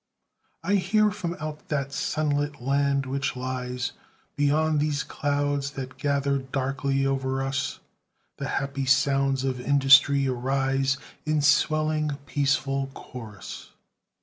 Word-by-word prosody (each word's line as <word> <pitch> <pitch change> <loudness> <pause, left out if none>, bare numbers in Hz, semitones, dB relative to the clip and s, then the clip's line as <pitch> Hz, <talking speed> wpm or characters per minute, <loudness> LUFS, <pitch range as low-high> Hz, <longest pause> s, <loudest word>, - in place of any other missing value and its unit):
I 200 +4 +2
hear 210 +3 +3
from 175 -4 -4
out 155 -1 -6
that 140 -2 -2
sunlit 145 0 -1
land 140 +2 +1
which 135 +1 -2
lies 125 -1 -3 0.4
Beyond 150 +2 +2
these 150 0 0
clouds 145 -1 -1
that 130 -1 -6
gather 140 -1 +1
darkly 135 +1 -1
o'er 135 0 0
us, 140 +1 -2 0.6
The - - -4
happy 140 0 -2
sounds 135 0 +2
of 130 -2 -1
industry 140 0 +5
arise 135 +1 0 0.3
In 155 0 +1
swelling 155 0 +2
peaceful 135 -1 0
chorus. 110 -5 -9
140 Hz, 115 wpm, -26 LUFS, 135-145 Hz, 0.6 s, industry